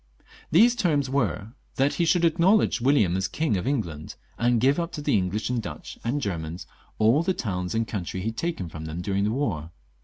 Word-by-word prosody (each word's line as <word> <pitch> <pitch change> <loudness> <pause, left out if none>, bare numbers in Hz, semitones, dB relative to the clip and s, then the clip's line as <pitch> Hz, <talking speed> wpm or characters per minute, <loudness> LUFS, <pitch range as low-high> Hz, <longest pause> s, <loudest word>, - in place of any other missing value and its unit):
These 230 +10 +5
terms 145 - +1
were, 110 - -1 0.2
that 135 +2 +2
he 170 - +1
should 170 +1 +3
acknowledge 170 - +3
William 120 -9 +3
as 95 0 0
King 155 -9 -1
of 95 +6 -2
England, 85 - -3 0.2
and 120 0 +2
give 135 +6 +3
up 170 0 -2
to 150 - -5
the - - +2
English 105 +4 -1
and 120 -2 0
Dutch 80 -7 -8
and 125 +5 -1
Germans 85 - -4 0.3
all 115 +8 +4
the 185 +2 0
towns 90 -2 -3
and 115 0 0
country 95 -2 -4
he 110 - -1
had 115 - -8
taken 165 - -2
from 80 -1 -8
them 80 +3 -5
during 100 +2 0
the - - +1
war. 100 - -2
115 Hz, 210 wpm, -25 LUFS, 90-145 Hz, 0.3 s, These